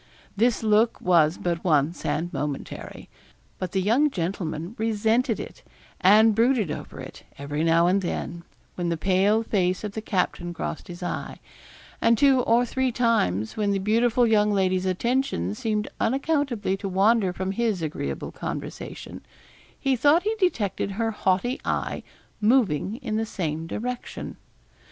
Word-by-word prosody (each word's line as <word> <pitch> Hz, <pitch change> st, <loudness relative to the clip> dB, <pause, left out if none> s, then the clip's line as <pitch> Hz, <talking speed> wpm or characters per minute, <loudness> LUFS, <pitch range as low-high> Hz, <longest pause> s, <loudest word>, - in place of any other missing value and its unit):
This 230 Hz, +2 st, +2 dB
look 220 Hz, +2 st, +3 dB
was 170 Hz, -2 st, +3 dB
but 170 Hz, -1 st, -2 dB
once 155 Hz, -2 st, +1 dB
and 175 Hz, +3 st, -2 dB
momentary; 145 Hz, -1 st, -5 dB, 0.5 s
but 185 Hz, -2 st, -3 dB
the 190 Hz, -, 0 dB
young 250 Hz, +9 st, +3 dB
gentleman 170 Hz, -, -3 dB
resented 225 Hz, +2 st, +1 dB
it, -, -, -8 dB, 0.4 s
and 215 Hz, +4 st, +6 dB
brooded 225 Hz, -, +2 dB
over -, -, -7 dB
it, -, -, -9 dB, 0.2 s
every 145 Hz, +2 st, -3 dB
now 165 Hz, +1 st, +4 dB
and 190 Hz, +3 st, +3 dB
then, 170 Hz, -1 st, -4 dB, 0.3 s
when 175 Hz, -1 st, -2 dB
the 170 Hz, -, -1 dB
pale 195 Hz, +5 st, +2 dB
face 185 Hz, -4 st, 0 dB
of 210 Hz, -, -3 dB
the 220 Hz, -, -5 dB
captain 180 Hz, -4 st, -2 dB
crossed 75 Hz, -, -5 dB
his 175 Hz, 0 st, -8 dB
eye; -, -, -4 dB, 0.6 s
and 230 Hz, 0 st, +4 dB
two 275 Hz, 0 st, +5 dB
or 240 Hz, +1 st, +3 dB
three 260 Hz, +1 st, 0 dB
times, 165 Hz, -, +1 dB
when 210 Hz, -2 st, 0 dB
the -, -, +1 dB
beautiful 230 Hz, +4 st, +2 dB
young 210 Hz, -2 st, +3 dB
lady's 190 Hz, -2 st, +1 dB
attention 185 Hz, -, 0 dB
seemed 210 Hz, -, -2 dB
unaccountably 270 Hz, -6 st, 0 dB
to 195 Hz, 0 st, -4 dB
wander 195 Hz, +1 st, +3 dB
from 185 Hz, +1 st, -3 dB
his 210 Hz, -4 st, -1 dB
agreeable 70 Hz, -, -4 dB
conversation, -, -, -7 dB, 0.6 s
he 270 Hz, -1 st, +1 dB
thought 290 Hz, +7 st, +4 dB
he 430 Hz, +2 st, 0 dB
detected 225 Hz, -, 0 dB
her 225 Hz, +2 st, -1 dB
haughty 210 Hz, +5 st, 0 dB
eye -, -, -2 dB, 0.4 s
moving 210 Hz, -, +2 dB
in 220 Hz, -3 st, -2 dB
the 225 Hz, -, 0 dB
same 160 Hz, -5 st, -3 dB
direction. 245 Hz, +7 st, -5 dB
205 Hz, 150 wpm, -25 LUFS, 175-230 Hz, 0.6 s, and